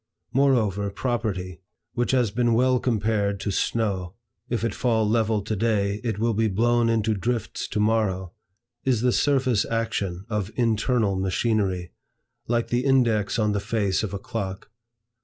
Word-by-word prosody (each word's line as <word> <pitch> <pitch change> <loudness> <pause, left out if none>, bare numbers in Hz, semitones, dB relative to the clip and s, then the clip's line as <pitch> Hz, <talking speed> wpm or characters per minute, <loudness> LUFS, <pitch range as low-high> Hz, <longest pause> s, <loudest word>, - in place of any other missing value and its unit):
Moreover, 110 -8 +2
property, 100 -5 -3 0.3
which 120 - -1
has 125 -5 +2
been 120 0 +2
well 130 +1 +3
compared 105 -4 0
to 100 - -2
snow, 95 -4 -1 0.3
"if 120 -2 -1
it 115 -3 0
fall 115 -3 +1
level 110 -1 +1
to 110 +1 -2
day, 105 -1 0
it 115 -4 -2
will 115 +2 +1
be 110 +1 +1
blown 115 +3 +2
into 110 -1 +1
drifts 115 +2 -2
to - - -3
morrow," 105 -4 0 0.5
is 125 -4 +1
the 125 0 +3
surface 130 -6 +2
action 105 -5 -2
of 105 -3 -2
internal 115 -2 +1
machinery, 95 -2 0 0.6
like 120 0 0
the 120 +1 +1
index 115 -7 +2
on 105 -2 +2
the 100 - 0
face 100 -2 0
of 110 - -3
a 100 - -3
clock. 100 -1 -5
110 Hz, 155 wpm, -25 LUFS, 100-120 Hz, 0.6 s, well